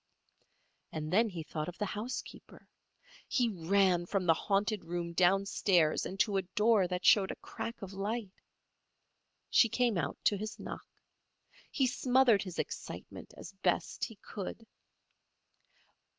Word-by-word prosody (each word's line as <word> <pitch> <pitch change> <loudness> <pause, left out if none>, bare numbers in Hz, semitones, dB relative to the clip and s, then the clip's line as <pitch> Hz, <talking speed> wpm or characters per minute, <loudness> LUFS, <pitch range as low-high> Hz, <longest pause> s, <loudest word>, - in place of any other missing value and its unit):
And 155 +1 -4
then 225 +3 +4
he 170 -4 -6
thought 155 +1 -4
of 180 - -10
the 210 - -1
housekeeper. 210 +5 -7 0.6
He 245 -3 +2
ran 180 -1 +2
from 195 -1 -1
the 165 - +6
haunted 200 +4 0
room 170 0 -3
downstairs 185 -2 +3
and 195 - -8
to 205 -3 +1
a - - +2
door 210 +1 +2
that 180 0 -3
showed 195 -2 +6
a - - -4
crack 230 - -7
of 195 0 -7
light. 205 +1 -3 1.2
She 230 - +6
came 235 -5 +1
out 145 -3 -2
to 205 - +3
his 215 +2 -5
knock. - - -8 0.8
He 270 - +1
smothered 250 -4 +3
his 185 -3 -7
excitement - - -6
as - - -9
best - - 0
he 225 - -10
could. 205 +2 -7
195 Hz, 140 wpm, -32 LUFS, 180-220 Hz, 1.2 s, the